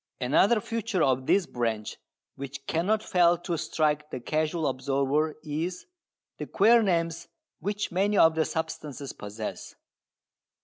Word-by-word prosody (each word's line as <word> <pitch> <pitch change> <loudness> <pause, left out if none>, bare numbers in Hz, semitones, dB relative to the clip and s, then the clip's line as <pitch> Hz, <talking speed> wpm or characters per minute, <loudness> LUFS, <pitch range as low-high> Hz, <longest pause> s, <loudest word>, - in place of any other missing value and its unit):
Another 170 - +3
feature 225 -4 -1
of 130 -1 +1
this 195 -2 +3
branch 115 -5 -3 0.4
which 140 0 -8
cannot 205 +9 0
fail 175 -1 +3
to 175 0 -3
strike 150 -1 0
the 130 - -5
casual 155 +5 -1
observer 140 +3 0
is 165 +4 -4 0.5
the - - -4
queer 230 +3 +5
names 170 -4 0 0.3
which 205 +1 -3
many 200 +3 +1
of 160 0 +6
the 160 -1 +1
substances 150 -4 -5
possess. 105 +1 -7
160 Hz, 130 wpm, -27 LUFS, 140-180 Hz, 0.5 s, of